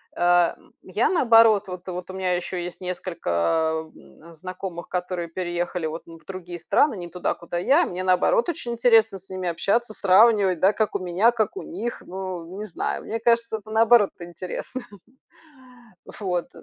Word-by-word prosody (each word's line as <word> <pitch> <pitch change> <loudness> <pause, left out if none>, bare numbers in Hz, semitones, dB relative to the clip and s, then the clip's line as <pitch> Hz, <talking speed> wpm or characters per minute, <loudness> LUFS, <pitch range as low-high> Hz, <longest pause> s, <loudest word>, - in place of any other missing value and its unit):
э, 175 -1 +3 0.3
я, - - 0
наоборот, 225 - +5
вот 180 0 -8
вот 180 0 -6
у - - -7
меня 185 -1 0
ещё 180 +1 -4
есть 175 +1 -6
несколько, 160 - -1
м, 170 +1 -16
знакомых, 185 +1 -7
которые 180 -1 -3
переехали, 175 0 -3
вот, 160 +2 -4
ну 165 0 -11
в - - -24
другие 180 -2 -7
страны, 220 - +2
не 175 -1 -6
туда, 175 +1 -2
куда 170 0 -5
я. 280 - +4
Мне, 180 +1 -4
наоборот, 345 - +3
очень 245 -7 -4
интересно 225 -4 +4
с 190 - -16
ними 185 -1 -4
общаться, 210 +7 0
сравнивать, 200 -2 +4
да, 195 +4 +4
как 215 -2 -1
у - - +1
меня, 185 +5 +2
как 235 - -1
у 395 - -5
них. 240 -8 -5
Ну, 185 -1 -6
не 210 - -5
знаю, 195 - -3
мне 225 - -4
кажется, 230 -1 +1
это, 215 0 -14
наоборот, 225 -1 +5
интересно. 180 +8 -6 1.2
Вот. 180 -4 -3
185 Hz, 170 wpm, -24 LUFS, 175-220 Hz, 1.2 s, наоборот